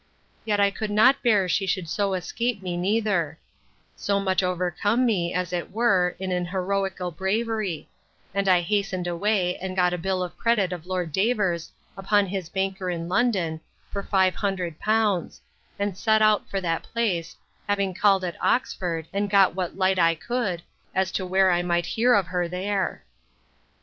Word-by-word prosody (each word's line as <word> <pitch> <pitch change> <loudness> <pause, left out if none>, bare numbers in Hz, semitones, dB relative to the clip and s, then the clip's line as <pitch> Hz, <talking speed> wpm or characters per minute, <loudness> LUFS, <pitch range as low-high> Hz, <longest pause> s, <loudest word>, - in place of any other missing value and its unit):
Yet 210 -2 +1
I 200 0 +4
could 215 +1 -4
not 220 +7 +4
bear 210 -6 +3
she 195 +2 0
should 185 -1 -1
so 195 +3 0
escape 200 +4 -2
me 180 -1 -3
neither; 190 -4 0 0.6
so 200 0 0
much 190 -1 +1
overcome 185 +6 0
me, 180 -7 +1
as 180 -1 -2
it 175 -1 -2
were, 190 -5 +2
in 190 -1 -4
an 180 -1 -1
heroical 190 0 -2
bravery; 200 0 -2 0.5
and 200 0 +1
I 180 -1 +5
hastened 195 -1 -1
away, 180 +1 0
and 185 0 -5
got 180 -1 +2
a 180 - -2
bill 185 +1 -1
of 180 - -6
credit 210 -6 +2
of 175 -1 -8
Lord 180 -3 -2
Davers, 190 -4 0 0.2
upon 200 +1 +2
his 185 -3 -4
banker 190 0 -2
in 170 -1 -3
London, 185 -7 +1 0.3
for 200 - -3
five 190 -2 +2
hundred 185 -5 -3
pounds; 215 -4 0 0.4
and 200 -2 -2
set 220 +3 +3
out 215 -1 +3
for 195 - -1
that 165 -3 -1
place, 190 -8 -2 0.3
having 200 -2 +1
called 195 0 +3
at 175 -2 -4
Oxford, 175 -9 0
and 200 +1 -1
got 195 -1 +5
what 185 0 -4
light 190 -1 +2
I 165 -1 +4
could, 195 -2 -2 0.3
as 190 0 +1
to 185 - -2
where 190 0 +4
I 175 0 +2
might 175 -1 0
hear 240 +5 +3
of 200 - +2
her 180 0 -1
there. 190 +2 -2
190 Hz, 175 wpm, -25 LUFS, 180-205 Hz, 0.6 s, I